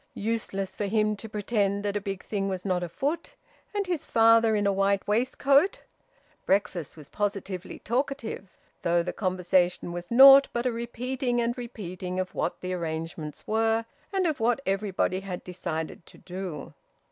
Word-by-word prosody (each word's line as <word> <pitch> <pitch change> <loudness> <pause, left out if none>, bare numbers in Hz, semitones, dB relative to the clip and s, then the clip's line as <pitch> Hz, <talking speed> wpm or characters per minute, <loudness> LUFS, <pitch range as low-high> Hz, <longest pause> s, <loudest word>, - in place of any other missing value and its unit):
Useless 200 -3 -2
for 205 - -2
him 215 +1 +2
to 225 - -8
pretend 205 -1 0
that 200 0 -1
a 205 - 0
big 195 -2 -5
thing 195 -2 -2
was 185 0 -4
not 180 -2 +1
afoot 285 - -3 0.4
and 405 -1 0
his 350 -5 -2
father 225 -1 +5
in 205 -1 +1
a 200 - +3
white 195 0 +1
waistcoat! 275 - +3 0.7
Breakfast 185 -5 0
was 150 -3 -11
positively 195 -2 -3
talkative, 240 -5 -3 0.3
though 170 0 +2
the 180 - -4
conversation 180 -2 +1
was 175 0 -6
naught 270 +3 +9
but 240 +1 -1
a 250 - +2
repeating 240 +2 -2
and 235 0 0
repeating 185 -7 -5
of 185 0 -3
what 175 - -2
the 185 0 -3
arrangements 160 -2 -5
were, 225 +1 +1 0.3
and 385 -2 +1
of 315 -4 0
what 235 +3 +2
everybody 195 -1 0
had 190 -2 -6
decided 170 -3 -5
to - - -15
do. 180 -4 -7
200 Hz, 160 wpm, -27 LUFS, 185-235 Hz, 0.7 s, naught